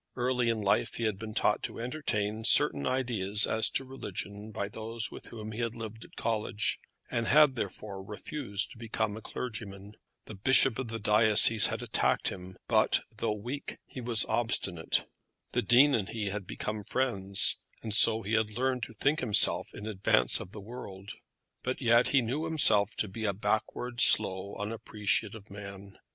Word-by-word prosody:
Early 125 -1 0
in 115 -2 -1
life 100 -1 +1
he 115 - -4
had 110 -3 -1
been 110 -1 -8
taught 105 - +1
to - - -6
entertain 110 -5 -3
certain 70 -9 +3
ideas 110 -5 0
as 110 0 0
to 135 - -1
religion 105 -4 -7
by 100 -2 -4
those 110 +2 -3
with - - -11
whom 110 -2 -8
he 110 - -7
had 115 0 -2
lived 110 -1 -8
at - - -17
college, 110 -1 -2 0.3
and 115 -1 -1
had 150 -1 +5
therefore 100 -2 -5
refused 105 +1 -3
to 115 - -13
become 110 -2 -3
a 110 - -8
clergyman. 105 -5 -7 0.3
The - - -9
bishop 130 +4 +3
of 130 - -3
the 115 0 -5
diocese 105 0 +5
had - - -4
attacked - - 0
him; 90 0 -9
but, - - +2
though 105 - -2
weak, 125 +7 -6
he 130 - -9
was 115 -2 +3
obstinate. 95 -8 0 0.4
The - - 0
Dean 140 +4 +5
and 105 -6 -1
he 105 -3 -3
had 100 -2 -5
become 105 0 -5
friends, 100 -6 0 0.2
and 110 -2 -4
so 110 +1 +6
he 105 +3 -4
had 110 -1 +2
learned 130 +3 -2
to - - -13
think 145 +8 +1
himself 110 -5 +3
in 105 - -9
advance 95 - +2
of 90 - -8
the 105 - -9
world. 100 -3 -9 0.5
But 130 +1 -3
yet 120 -1 +4
he 135 -3 +3
knew 135 +8 -3
himself 110 -11 +4
to 110 - -2
be 110 +3 -6
a 100 - 0
backward, 110 +4 -2
slow, 100 -2 +6
unappreciative 105 0 -3
man. 100 -1 -10
110 Hz, 175 wpm, -29 LUFS, 100-120 Hz, 0.5 s, so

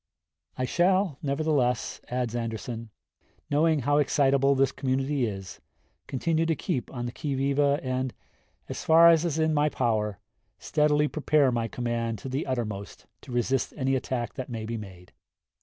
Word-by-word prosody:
"I 130 - 0
shall, 180 +1 +2
nevertheless," 140 -4 0
adds 125 -2 -2
Anderson, 115 0 -4 0.6
"knowing 155 +1 +3
how 145 +4 +2
excitable 140 -1 +3
this 135 0 +3
community 135 -1 0
is, 95 -3 -7 0.5
continue 160 +4 0
to 165 - +2
keep 150 -5 -3
on 120 -2 -4
the 120 - -3
qui 145 +1 -3
vive 135 +1 0
and, 130 -3 +1 0.6
as - - -5
far 165 +1 +7
as 165 0 +4
is 160 -3 -1
in 160 0 +2
my 150 0 +3
power, 110 -6 0 0.4
steadily 150 +2 +2
prepare 150 -3 +2
my 115 -1 -1
command 115 -1 -2
to 135 - -7
the 135 +4 -2
uttermost 110 -6 -4 0.2
to - - -11
resist 120 +2 0
any 135 -1 +1
attack 120 -3 -2
that 130 -1 -6
may 115 -2 -4
be 115 +1 -4
made.... 95 -5 -10
130 Hz, 155 wpm, -27 LUFS, 120-150 Hz, 0.6 s, far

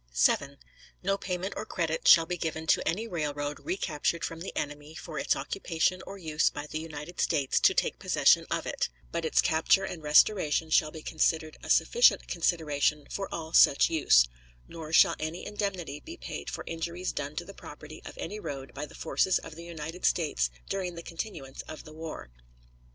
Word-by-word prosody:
7. 140 - +2 0.5
No 195 +2 +2
payment 190 0 -3
or - - -3
credit 165 -6 -2
shall 165 -1 +8
be 180 +2 -2
given 160 -1 -3
to - - +2
any 215 +7 -1
railroad 145 -5 -3
recaptured 170 - -1
from 165 - -6
the 180 - -6
enemy 145 +2 -5
for 160 -3 -6
its - - +2
occupation 185 0 -1
or 200 - -7
use 155 -4 +1
by 145 - -6
the 155 +1 -4
United 160 +1 -6
States 140 -5 +1
to - - +4
take - - 0
possession - - +4
of - - -1
it, - - -2 0.2
but 165 - -2
its 160 - +3
capture 160 +3 +3
and 175 -3 -5
restoration 155 +1 +3
shall 155 - +4
be 155 0 -10
considered 155 0 0
a - - -9
sufficient 480 +1 +4
consideration 150 -4 0
for 195 -1 -4
all 160 0 -5
such 140 - +6
use; - - +5 0.4
nor 160 -2 -8
shall - - +6
any 155 +2 -4
indemnity 190 -8 -3
be 335 +2 -10
paid - - -6
for - - -5
injuries 170 +2 -3
done 145 +2 -5
to 175 - -4
the 195 - -10
property - - -11
of - - -10
any 215 - -5
road 135 -8 -6
by 145 +2 -5
the - - -15
forces 190 - +1
of - - -9
the 165 +2 -10
United 165 +1 -7
States 145 - +1 0.2
during 180 -3 -3
the 170 - -8
continuance 165 -7 -6
of 155 - -8
the 155 - -12
war. 160 - -8
160 Hz, 190 wpm, -29 LUFS, 150-180 Hz, 0.5 s, shall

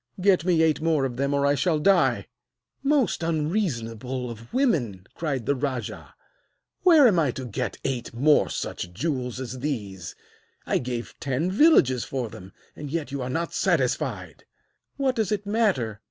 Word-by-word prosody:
Get 185 -3 +3
me 170 -3 +3
eight 155 -1 +2
more 160 -4 +2
of 120 -2 -4
them 140 +1 0
or 140 0 +1
I 140 - +4
shall 155 +4 +1
die!' 185 +3 +3 0.6
'Most 275 - +1
unreasonable 130 - -2
of 115 0 -11
women,' 125 - 0
cried 140 -8 -3
the 140 - +2
rajah, 130 -2 -4 0.7
'where 320 -7 +7
am 190 -7 +3
I 150 -4 +2
to 130 +1 -5
get 125 +2 -3
eight 130 -3 -3
more 145 +6 +3
such 90 - -4
jewels 125 - -2
as 130 0 -6
these? 105 - -4 0.5
I - - +1
gave 120 -1 -5
ten 140 +7 -1
villages 190 - +4
for 130 -4 -3
them, 95 -1 -11 0.2
and 150 -1 -7
yet 150 -3 -3
you 140 -1 -3
are 125 - -3
not 165 +5 -2
satisfied!' - - -1 0.5
'What 270 -2 +1
does 220 -4 0
it 205 -1 -1
matter?' 195 - 0
140 Hz, 165 wpm, -25 LUFS, 125-175 Hz, 0.7 s, where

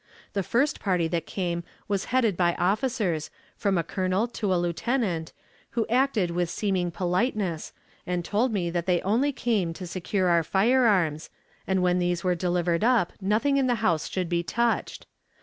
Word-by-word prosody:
The 200 - 0
first 250 +10 +1
party 180 -4 +1
that 165 0 -2
came 175 -3 -2 0.2
was 200 -1 -1
headed 235 -6 +2
by 175 -1 +2
officers, 200 - 0 0.3
from 200 -3 0
a 170 - +1
colonel 185 +5 0
to 215 -4 -2
a 185 - +3
lieutenant, 175 0 -1 0.5
who 225 - +2
acted 240 -7 +2
with 175 0 -1
seeming 185 -1 -1
politeness, 180 -1 -1 0.4
and 175 -1 -2
told 230 +5 +1
me 180 -5 -1
that 170 0 -2
they 180 -2 +2
only 235 +9 +2
came 215 -10 0
to 180 +2 -7
secure 185 +2 -1
our 170 -1 +4
firearms, 190 - +2 0.4
and 190 -1 +1
when 180 0 +2
these 175 -1 0
were 180 -1 +2
delivered 175 0 0
up 235 -7 +3
nothing 225 +9 +2
in 270 -2 +2
the 245 - +2
house 165 -6 +1
should 185 -2 -2
be 170 0 0
touched. 235 +6 -1
185 Hz, 170 wpm, -26 LUFS, 175-220 Hz, 0.5 s, our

